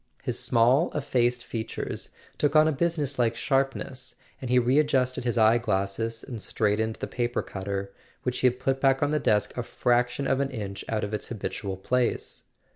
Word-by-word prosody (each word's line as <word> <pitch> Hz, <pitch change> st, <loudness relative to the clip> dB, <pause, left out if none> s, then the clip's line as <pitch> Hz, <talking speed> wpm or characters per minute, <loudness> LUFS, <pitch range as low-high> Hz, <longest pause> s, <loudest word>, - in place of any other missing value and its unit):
His -, -, -2 dB
small 125 Hz, +8 st, +3 dB
effaced 125 Hz, -4 st, +1 dB
features 110 Hz, -1 st, -4 dB, 0.3 s
took 145 Hz, 0 st, +2 dB
on 155 Hz, 0 st, +7 dB
a -, -, +3 dB
business 150 Hz, -3 st, 0 dB
like 115 Hz, -1 st, +2 dB
sharpness, 135 Hz, 0 st, -1 dB, 0.3 s
and 130 Hz, -, -4 dB
he 125 Hz, 0 st, +5 dB
re¬ 125 Hz, +4 st, +3 dB
adjusted 130 Hz, -4 st, +1 dB
his 120 Hz, -1 st, 0 dB
eye 110 Hz, +1 st, +5 dB
glasses 110 Hz, +2 st, -1 dB
and 120 Hz, -5 st, -7 dB
straightened 110 Hz, +1 st, 0 dB
the -, -, -4 dB
paper 120 Hz, 0 st, -2 dB
cutter, 100 Hz, 0 st, -4 dB, 0.3 s
which 125 Hz, 0 st, -1 dB
he 130 Hz, -, +5 dB
had 125 Hz, 0 st, 0 dB
put 135 Hz, +1 st, 0 dB
back 135 Hz, 0 st, +3 dB
on 145 Hz, -, +1 dB
the 150 Hz, -, +2 dB
desk 105 Hz, -6 st, +1 dB
a 125 Hz, -, -1 dB
fraction 120 Hz, +2 st, 0 dB
of 135 Hz, 0 st, +1 dB
an 140 Hz, -1 st, 0 dB
inch 100 Hz, -6 st, -5 dB
out 110 Hz, -1 st, -1 dB
of 105 Hz, +1 st, -3 dB
its 105 Hz, -, -3 dB
habitual 100 Hz, -3 st, -4 dB
place. 125 Hz, +5 st, -1 dB
125 Hz, 190 wpm, -27 LUFS, 110-135 Hz, 0.3 s, on